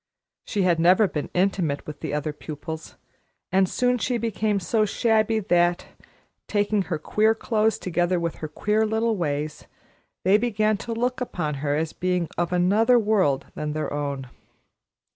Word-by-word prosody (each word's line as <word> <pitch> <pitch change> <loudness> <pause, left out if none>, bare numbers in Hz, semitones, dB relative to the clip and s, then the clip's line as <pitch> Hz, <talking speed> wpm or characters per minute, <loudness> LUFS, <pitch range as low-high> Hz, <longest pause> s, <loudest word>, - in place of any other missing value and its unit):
She 200 - 0
had 175 -2 +2
never 185 +5 +5
been 150 -5 -4
intimate 180 -6 0
with 150 -1 -8
the - - -4
other 150 +1 -2
pupils, 160 +2 -7 0.6
and 190 0 +3
soon 250 -1 +1
she 245 +2 0
became 215 -2 0
so 215 +4 +1
shabby 220 +1 +2
that, 175 -3 +1 0.6
taking 205 0 +1
her 180 -3 -3
queer 215 +8 +2
clothes 220 -1 +1
together 175 0 0
with 170 -1 -3
her 155 - -5
queer 210 +8 0
little 220 +1 +1
ways, 150 -4 -3 0.6
they 195 +3 +5
began 215 -2 +1
to 230 +3 -5
look 245 +2 -1
upon 175 -11 -2
her 145 -1 0
as 160 +1 -1
a - - -24
being 180 -2 0
of 175 0 -1
another 205 +7 +4
world 205 - +2
than 150 0 -4
their 155 -1 -3
own. 140 -2 -3
185 Hz, 160 wpm, -24 LUFS, 160-220 Hz, 0.6 s, never